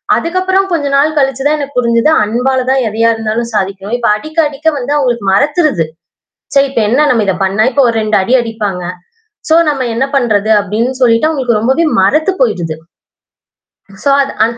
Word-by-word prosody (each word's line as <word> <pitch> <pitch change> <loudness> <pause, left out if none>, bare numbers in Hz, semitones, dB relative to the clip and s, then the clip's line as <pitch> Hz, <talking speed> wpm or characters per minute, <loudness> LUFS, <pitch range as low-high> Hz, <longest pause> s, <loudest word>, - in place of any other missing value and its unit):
அதுக்கு 335 +2 -1
அப்புறம் 380 +1 +1
கொஞ்சம் 290 -5 -1
நாள் 305 +2 +1
கழிச்சிதான் 270 +2 0
எனக்கு 285 -2 -6
புரிஞ்சது. 235 +2 +2
அன்பால 250 +5 0
தான் 265 0 +2
எதையா 225 +2 +1
இருந்தாலும் 225 +1 -3
சாதிக்கவே 195 +1 -3
இப்ப 235 - 0
அடிக்க, 310 +8 -10
அடிக்க 295 +2 -6
வந்து 255 +2 -4
அவுங்களுக்கு 245 -7 -1
மரத்துருது. 285 - +1 0.7
சரி 275 0 +4
இப்ப 255 -4 -1
என்ன 265 +7 +2
நாம் 230 -3 +2
இத 195 - +1
பண்ண, 195 +2 0
இப்ப 280 - 0
ஒரு 230 - -1
2 215 -1 0
அடி 190 +6 -2
அடிப்பாங்க. 215 -6 -3 0.7
சோ 320 - +4
நாம் 285 -3 0
என்ன 260 +3 +1
பண்றது 220 -5 +1
அப்பிடின்னு 230 +6 -2
சொல்லிட்டு 235 +3 +3
அவுங்களுக்கு 260 -8 0
ரொம்பவே 265 +9 +1 0.2
மரத்துப் 310 - +1
போயிருது. 175 -10 -1 1.3
சோ 280 - +4
அது 270 - -6
அந் 230 +1 -4
245 Hz, 175 wpm, -12 LUFS, 215-285 Hz, 1.3 s, சரி